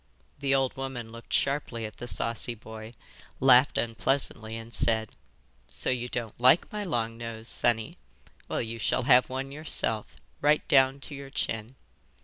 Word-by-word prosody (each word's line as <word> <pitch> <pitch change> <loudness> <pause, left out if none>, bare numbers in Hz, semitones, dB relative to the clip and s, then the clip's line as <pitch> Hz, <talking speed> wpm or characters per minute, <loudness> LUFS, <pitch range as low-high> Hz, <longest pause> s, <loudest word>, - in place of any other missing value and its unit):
The 135 -1 +2
old 135 -1 +1
woman 130 -4 -5
looked 115 +1 -12
sharply 135 -5 0
at 110 - -8
the 120 - -7
saucy 115 0 0
boy, 110 +1 -10 0.4
laughed 130 +1 +6
unpleasantly, 115 0 -1
and 115 +1 -10
said: 110 -2 +1 0.6
'So - - -2
you 125 -1 -2
don't 120 -2 -5
like 130 +7 +5
my 210 - -3
long 115 - -2
nose, 115 -1 -7
sonny? 115 -3 +1 0.5
Well, - - -1
you 115 0 -6
shall 115 - +1
have 125 -1 +5
one 135 +1 -4
yourself, 140 -7 0 0.3
right 150 +1 +3
down 135 -2 +4
to 145 - -7
your 140 -1 -8
chin. 110 -1 -3
120 Hz, 155 wpm, -28 LUFS, 115-135 Hz, 0.6 s, laughed